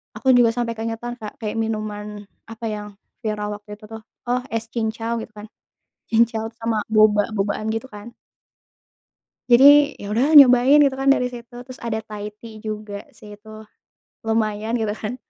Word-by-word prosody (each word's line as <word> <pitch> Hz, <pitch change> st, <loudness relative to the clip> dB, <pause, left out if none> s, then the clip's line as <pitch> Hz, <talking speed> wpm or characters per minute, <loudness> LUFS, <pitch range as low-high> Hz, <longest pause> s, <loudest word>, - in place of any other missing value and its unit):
Aku -, -, -7 dB
juga 235 Hz, -2 st, +5 dB
sampai 240 Hz, -1 st, -1 dB
keingetan 230 Hz, +2 st, -4 dB
Kak 215 Hz, +2 st, -7 dB
kayak 215 Hz, -3 st, -4 dB
minuman 215 Hz, -1 st, -4 dB, 0.5 s
apa 225 Hz, +1 st, -8 dB
yang 210 Hz, 0 st, -7 dB, 0.4 s
viral 210 Hz, -1 st, -3 dB
waktu 210 Hz, -, -28 dB
itu 215 Hz, -, -24 dB
tuh, 225 Hz, -, -7 dB, 0.3 s
oh 250 Hz, +1 st, +1 dB
es 225 Hz, 0 st, -2 dB
cincau 225 Hz, 0 st, -3 dB
gitu 220 Hz, -, -10 dB
kan, 210 Hz, +1 st, -10 dB, 0.6 s
cincau 225 Hz, -1 st, +2 dB
sama 230 Hz, -1 st, -2 dB, 0.2 s
boba-bobaan 210 Hz, -1 st, +2 dB
gitu 225 Hz, +4 st, -4 dB
kan. 210 Hz, +2 st, -11 dB, 1.4 s
Jadi 285 Hz, +4 st, +7 dB
ya 200 Hz, -, -7 dB
udahlah 250 Hz, +9 st, +1 dB
nyobain 260 Hz, +2 st, +6 dB
gitu 275 Hz, -2 st, +3 dB
kan 270 Hz, 0 st, -1 dB
dari 250 Hz, -2 st, 0 dB
situ, 245 Hz, 0 st, -11 dB, 0.2 s
terus 255 Hz, -, -9 dB
ada 220 Hz, -1 st, -2 dB
Thai 210 Hz, -1 st, -8 dB
tea 225 Hz, -2 st, -11 dB
juga 210 Hz, -1 st, -6 dB
sih 210 Hz, -1 st, -13 dB
itu, 215 Hz, +1 st, -19 dB, 0.8 s
lumayan 220 Hz, 0 st, -1 dB
gitu 220 Hz, -3 st, -1 dB
kan. 215 Hz, +3 st, -5 dB
225 Hz, 160 wpm, -21 LUFS, 210-240 Hz, 1.4 s, Jadi